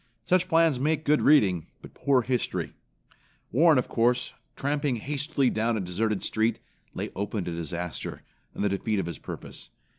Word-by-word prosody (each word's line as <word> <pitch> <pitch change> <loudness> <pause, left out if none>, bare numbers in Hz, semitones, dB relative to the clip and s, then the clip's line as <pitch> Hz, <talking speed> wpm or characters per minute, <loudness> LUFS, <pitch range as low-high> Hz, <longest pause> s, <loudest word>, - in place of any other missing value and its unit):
Such 180 0 +3
plans 165 -5 +4
make 155 +3 0
good 150 +1 +3
reading, 95 - +4 0.2
but - - -12
poor 135 -3 +2
history. 125 -1 -2 0.8
Warren, 155 +4 +5
of 125 - +1
course, 120 +2 +1 0.2
tramping 140 -1 0
hastily 140 +2 0
down 110 +1 0
a - - -1
deserted 100 +3 -1
street, 110 +1 +1 0.4
lay - - -4
open 100 0 -2
to 85 - -4
disaster, 85 +1 -5 0.3
and - - -2
the 105 - +2
defeat 105 +2 -1
of 95 - 0
his 85 - -6
purpose. - - -8
120 Hz, 160 wpm, -27 LUFS, 100-145 Hz, 0.8 s, Warren